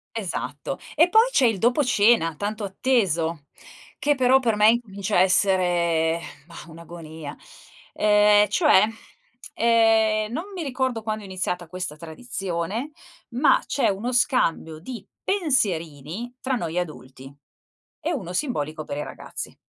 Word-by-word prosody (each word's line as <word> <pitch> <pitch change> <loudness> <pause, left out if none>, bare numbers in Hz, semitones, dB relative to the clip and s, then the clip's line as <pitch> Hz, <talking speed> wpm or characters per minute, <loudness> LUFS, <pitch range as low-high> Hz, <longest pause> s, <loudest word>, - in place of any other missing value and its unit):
Esatto. 200 -6 -4 0.2
E 330 +3 +5
poi 445 +5 +5
c'è 275 - +3
il 220 -4 +1
dopo 245 +7 +2
cena, 210 -8 +3
tanto 205 +4 -4
atteso, 180 - 0 0.5
che 290 0 +2
però 260 0 +4
per 230 -4 0
me 210 +1 +5
incomincia 205 -4 -2
a - - +5
essere, 175 -4 +2 0.3
mah, 170 - -11
un'agonia. 160 -2 -10 0.6
Ehm, 210 -1 +4
cioè, 285 - +4 0.7
ehm, 225 -2 +3
non 320 +8 -3
mi 355 - -4
ricordo 260 -4 -2
quando 215 -1 -4
è 200 - -10
iniziata 180 -2 -4
questa 180 -3 -5
tradizione, 190 - -5 0.4
ma 255 +5 +3
c'è 275 - +1
uno 210 +6 -2
scambio 165 -10 +1
di 235 +9 -9 0.2
pensierini 210 - -1
tra 260 0 -1
noi 170 -4 -3
adulti 135 -5 -7 0.7
e 335 - -2
uno 185 - -5
simbolico 155 - -3
per 145 - -6
i - - -2
ragazzi. - - -8
210 Hz, 135 wpm, -24 LUFS, 170-245 Hz, 0.7 s, E